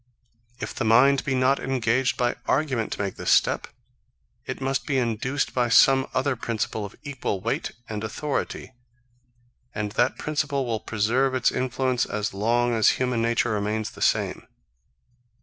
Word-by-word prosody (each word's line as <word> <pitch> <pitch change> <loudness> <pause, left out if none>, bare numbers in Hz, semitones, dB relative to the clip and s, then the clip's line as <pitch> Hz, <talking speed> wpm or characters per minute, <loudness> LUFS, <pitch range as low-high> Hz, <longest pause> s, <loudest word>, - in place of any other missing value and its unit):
If - - -5
the - - -3
mind 130 +5 +5
be 135 -3 0
not 130 +2 +3
engaged 130 -1 0
by 120 -1 +1
argument 130 -6 0
to - - -4
make 100 -2 -4
this - - -3
step, - - +3 0.8
it - - -4
must 135 0 -2
be 140 -3 +1
induced 125 +3 -1
by 120 -2 +1
some 135 +3 +5
other 130 +1 0
principle 110 -2 -3
of 100 - -10
equal 135 -8 -3
weight 115 +5 -2
and 105 -1 -5
authority; 130 +3 -3 1.0
and 105 -1 -2
that 120 +4 +1
principle 145 -3 -1
will 115 -2 -2
preserve 120 +6 0
its 130 - +2
influence 130 -1 0
as 105 -1 -3
long 120 +4 +1
as 110 -2 +4
human 125 -2 0
nature 115 0 +1
remains 105 +1 -2
the - - -13
same. - - 0
120 Hz, 155 wpm, -25 LUFS, 110-135 Hz, 1.0 s, mind